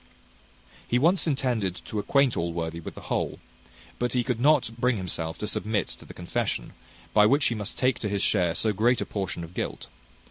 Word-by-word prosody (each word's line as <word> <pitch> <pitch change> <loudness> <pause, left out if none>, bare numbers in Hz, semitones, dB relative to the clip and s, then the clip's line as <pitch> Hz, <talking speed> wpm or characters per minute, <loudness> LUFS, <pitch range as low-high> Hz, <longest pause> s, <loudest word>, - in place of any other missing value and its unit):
He 120 - +2
once 170 +7 +3
intended 125 - 0
to 110 - -3
acquaint 135 +5 +3
Allworthy 85 -1 -2
with 85 - -8
the - - -9
whole; - - -2 0.6
but 120 -1 0
he 125 -1 +2
could 125 -2 -1
not 145 -4 +4
bring 125 -1 +2
himself 80 -3 -3
to 105 - -4
submit 105 0 0
to - - -9
the - - -11
confession, - - -2 0.4
by 105 0 +6
which 140 +4 +3
he - - -1
must 105 -3 -5
take 130 -2 +2
to 105 - -2
his 100 -1 0
share 90 -5 +2
so 110 -1 +1
great 120 +4 +3
a - - -1
portion 95 -4 -3
of 85 +1 -10
guilt. - - -4
110 Hz, 200 wpm, -27 LUFS, 95-125 Hz, 0.6 s, by